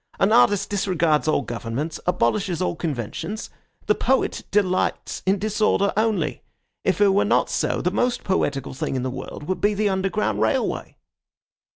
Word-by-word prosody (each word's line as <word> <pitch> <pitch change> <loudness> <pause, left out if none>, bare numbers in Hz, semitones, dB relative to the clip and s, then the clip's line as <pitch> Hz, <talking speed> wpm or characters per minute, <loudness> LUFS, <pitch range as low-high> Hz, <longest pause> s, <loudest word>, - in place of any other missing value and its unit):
An 195 - +3
artist 205 -4 +4
disregards 170 -7 +1
all 155 - +2
governments, 120 +7 -4
abolishes 180 - +1
all 180 - -1
conventions. 165 - -4 0.3
The 210 - +4
poet 260 +4 0
delights 190 -3 0
in 195 +1 +3
disorder 210 -1 +1
only. 210 -8 0 0.4
If 190 - +1
it 205 - +6
were 195 +1 +3
not - - +2
so, - - 0
the - - +1
most 245 -1 0
poetical 145 -9 -1
thing 130 - -3
in 130 - -1
the 130 - -2
world 130 +3 -7
would 185 +5 -3
be 205 0 +2
the 210 0 +1
Underground 190 - 0
Railway." 110 0 -1
190 Hz, 160 wpm, -23 LUFS, 150-205 Hz, 0.4 s, it